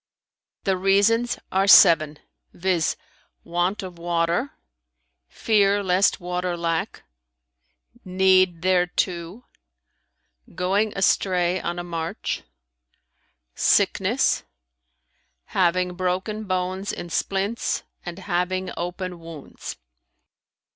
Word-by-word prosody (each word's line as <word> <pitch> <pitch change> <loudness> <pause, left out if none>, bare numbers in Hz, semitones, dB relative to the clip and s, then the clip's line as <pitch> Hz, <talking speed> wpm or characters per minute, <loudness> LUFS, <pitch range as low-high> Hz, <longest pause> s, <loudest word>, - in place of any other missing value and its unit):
"The 190 -1 +1
reasons 200 +5 +2
are 195 +1 +2
seven, 155 -6 +7 0.4
viz.: 175 -2 0 0.5
want 175 +4 -1
of 180 -2 -9
water; 170 +8 -1 0.7
fear 205 - +2
lest 185 +1 +2
water 180 0 -3
lack; 165 -1 -2 1.0
need 185 -2 +3
thereto; 180 +2 0 1.1
going 195 +4 +1
astray 185 -1 +1
on 175 0 -3
a 175 - -4
march; 165 -2 -4 1.1
sickness; - - +2 1.1
having 180 0 +1
broken 185 +4 -2
bones 185 +1 -2
in 175 - -7
splints 200 +6 -1 0.2
and 175 -1 -7
having 185 -1 -2
open 180 0 -5
wounds. 165 -3 -9
180 Hz, 85 wpm, -23 LUFS, 175-195 Hz, 1.1 s, seven